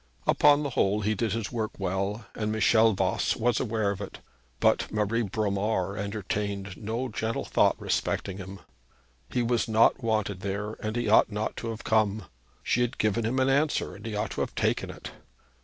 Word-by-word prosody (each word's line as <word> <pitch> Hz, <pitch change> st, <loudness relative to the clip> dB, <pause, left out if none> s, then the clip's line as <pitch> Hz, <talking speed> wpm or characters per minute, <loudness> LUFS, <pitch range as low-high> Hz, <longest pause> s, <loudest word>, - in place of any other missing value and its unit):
Upon 145 Hz, 0 st, +5 dB
the 140 Hz, -, -2 dB
whole 105 Hz, -2 st, +1 dB
he 105 Hz, +1 st, +1 dB
did 110 Hz, 0 st, -1 dB
his 115 Hz, -3 st, -3 dB
work 110 Hz, -3 st, -2 dB
well, 100 Hz, +4 st, -2 dB
and 105 Hz, -1 st, -2 dB
Michel 110 Hz, +1 st, +4 dB
Voss 95 Hz, -, +1 dB
was 120 Hz, +2 st, +1 dB
aware 110 Hz, -4 st, 0 dB
of 100 Hz, 0 st, -5 dB
it; 100 Hz, -, -7 dB, 0.4 s
but -, -, +2 dB
Marie 105 Hz, +2 st, 0 dB
Bromar 100 Hz, -2 st, -1 dB
entertained 100 Hz, -1 st, -3 dB
no 115 Hz, +4 st, -3 dB
gentle 110 Hz, +1 st, -2 dB
thought -, -, +2 dB
respecting 95 Hz, -, -1 dB
him. 95 Hz, 0 st, -8 dB, 0.7 s
He 125 Hz, -, 0 dB
was 120 Hz, 0 st, +1 dB
not 115 Hz, +3 st, +4 dB
wanted 110 Hz, -4 st, 0 dB
there, 100 Hz, +2 st, -3 dB
and 110 Hz, +1 st, -3 dB
he 120 Hz, -2 st, -1 dB
ought 110 Hz, +1 st, +5 dB
not 105 Hz, +1 st, -2 dB
to 115 Hz, -, -4 dB
have 115 Hz, 0 st, -6 dB
come. 110 Hz, -1 st, +2 dB, 0.4 s
She 125 Hz, -, +1 dB
had 120 Hz, +1 st, -1 dB
given 110 Hz, +1 st, +1 dB
him 125 Hz, +3 st, -1 dB
an 130 Hz, 0 st, +3 dB
answer, 145 Hz, +3 st, +1 dB
and -, -, -12 dB
he 110 Hz, -2 st, -4 dB
ought 105 Hz, -, -2 dB
to -, -, -3 dB
have -, -, -3 dB
taken -, -, 0 dB
it. -, -, -8 dB
110 Hz, 190 wpm, -27 LUFS, 100-115 Hz, 0.7 s, Upon